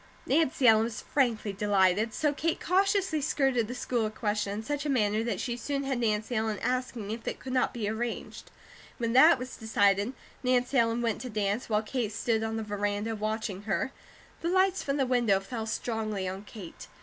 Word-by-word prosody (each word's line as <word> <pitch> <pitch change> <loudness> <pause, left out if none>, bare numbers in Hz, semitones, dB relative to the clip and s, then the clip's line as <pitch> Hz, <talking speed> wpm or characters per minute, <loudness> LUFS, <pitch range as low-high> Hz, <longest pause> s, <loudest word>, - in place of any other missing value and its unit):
Nancy 285 -2 +2
Ellen 220 -1 +6
was 230 -1 -5
frankly 230 -7 0
delighted, 200 +1 +2
so 295 +5 0
Kate 325 +3 -1
cautiously 385 -3 +2
skirted 270 -5 +1
the 245 - -5
school 240 -3 -1
question 210 -2 -2
in 215 +2 -4
such 290 +4 -2
a 300 - -2
manner 215 -4 +2
that 230 -5 -2
she 240 -2 -2
soon 275 +3 -3
had 270 -2 -1
Nancy 220 +1 0
Ellen 220 -1 0
asking 250 -4 -2
if 225 +1 -6
it - - -2
could 260 - -6
not 255 - +2
be 225 -4 -3
arranged. 225 +2 -4 0.5
When 230 -2 -1
that 310 +6 +7
was 255 +1 -7
decided, 205 0 +2 0.3
Nancy 250 +1 +1
Ellen 230 +1 +1
went 225 -2 -1
to 255 - -5
dance, 210 +1 -1
while 215 0 +2
Kate 225 -1 -2
stood 225 +1 0
on 225 0 -2
the 220 - -2
veranda 205 +1 -2
watching 215 -2 -3
her. 255 - 0 0.5
The 335 - -1
lights 375 +1 +3
from 275 0 -1
the 270 - +2
window 240 -6 +3
fell 220 +3 -5
strongly 215 -4 -2
on 190 +2 -5
Kate. 185 - -10
230 Hz, 195 wpm, -29 LUFS, 210-255 Hz, 0.5 s, that